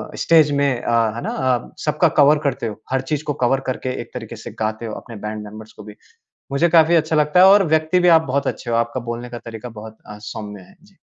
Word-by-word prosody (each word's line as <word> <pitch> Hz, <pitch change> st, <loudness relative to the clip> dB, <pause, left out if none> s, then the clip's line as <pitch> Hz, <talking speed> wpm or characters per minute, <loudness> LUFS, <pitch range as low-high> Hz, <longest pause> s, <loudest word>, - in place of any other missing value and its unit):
Stage 160 Hz, -3 st, +4 dB
में 140 Hz, -4 st, 0 dB
अ, -, -, -3 dB, 0.2 s
है 120 Hz, -, -5 dB
ना -, -, -3 dB
अ, 130 Hz, -2 st, -1 dB
सबका 150 Hz, +3 st, +2 dB
कवर 145 Hz, +2 st, +6 dB
करते 135 Hz, -5 st, -1 dB
हो। 105 Hz, -, -8 dB
हर 130 Hz, 0 st, +1 dB
चीज़ 150 Hz, 0 st, -1 dB
को 150 Hz, -, -2 dB
कवर 135 Hz, +2 st, +2 dB
करके 130 Hz, -, -5 dB
एक -, -, -12 dB
तरीके 115 Hz, -2 st, -7 dB
से 110 Hz, -, -9 dB
गाते 110 Hz, +1 st, -3 dB
हो 110 Hz, -, -5 dB
अपने 115 Hz, -, -12 dB
बैंड 105 Hz, 0 st, -5 dB
मेंबर्स 110 Hz, +1 st, -11 dB
को -, -, -12 dB
भी। 105 Hz, 0 st, -12 dB, 0.6 s
मुझे 140 Hz, +5 st, +2 dB
काफ़ी 165 Hz, 0 st, +5 dB
अच्छा 160 Hz, -1 st, +1 dB
लगता 150 Hz, +3 st, +3 dB
है 185 Hz, -, +8 dB
और 200 Hz, +1 st, +6 dB
व्यक्ति 160 Hz, +3 st, +2 dB
भी 180 Hz, -, +2 dB
आप -, -, 0 dB
बहुत 140 Hz, +1 st, -1 dB
अच्छे 120 Hz, -, -4 dB
हो। -, -, +1 dB
आपका 115 Hz, +2 st, -1 dB
बोलने 120 Hz, +1 st, -6 dB
का 120 Hz, 0 st, -7 dB
तरीका 115 Hz, +1 st, -8 dB
बहुत 110 Hz, 0 st, -11 dB
अ, 105 Hz, -, -9 dB
सौम्य 105 Hz, -2 st, -8 dB
है। -, -, -19 dB
जी। -, -, -24 dB
130 Hz, 250 wpm, -20 LUFS, 110-150 Hz, 0.6 s, है